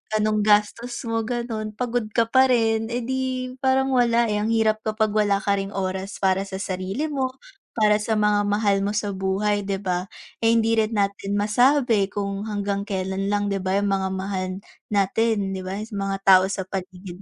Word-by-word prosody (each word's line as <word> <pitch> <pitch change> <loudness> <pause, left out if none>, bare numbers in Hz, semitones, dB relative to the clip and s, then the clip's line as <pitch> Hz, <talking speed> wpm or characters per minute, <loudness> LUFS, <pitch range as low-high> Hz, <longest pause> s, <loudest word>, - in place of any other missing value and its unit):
anong 215 0 +1
gastos 210 +3 +2
mo 225 -2 -2
gano'n, 225 -3 -4
pagod 245 -1 -2
ka 230 - +5
pa 260 0 +6
rin, 225 -3 +2
eh, 240 +1 -3
'di 255 0 -3
parang 265 0 +2
wala, 235 -2 +3
eh, 210 - 0
ang 210 - -1
hirap 220 -1 +2
kapag 215 0 -1
wala 205 -2 +1
ka 200 -1 +1
ring 195 +1 -5
oras 190 +1 -4
para 190 +1 +2
sa 195 - -6
sarili 195 +9 -3
mo, 260 -2 -2 0.4
para 210 -1 +5
sa 210 +2 -2
mga 210 -1 +2
mahal 205 -1 +2
mo 200 - 0
sa 205 -1 -2
buhay, 195 +2 0
'di 195 0 -2
ba, 185 -1 -2 0.3
eh, 225 - +3
hindi 225 0 +3
rin 220 0 +1
natin 200 0 -1
masabi 230 -1 +3
kung 200 -1 -3
hanggang 205 -2 -2
kelan 195 -1 -2
lang, 205 0 0
'di 200 -1 -1
ba, 190 +1 0
'yong 205 - 0
mga 195 -1 0
mahal 190 0 -3 0.4
natin, 205 0 +1
'di 190 - -4
ba, 190 +1 -4
s 215 +1 -8
mga 195 0 -2
tao 185 -1 +8
sa 190 -1 -3
paligid 185 -1 -7
210 Hz, 190 wpm, -23 LUFS, 195-225 Hz, 0.4 s, tao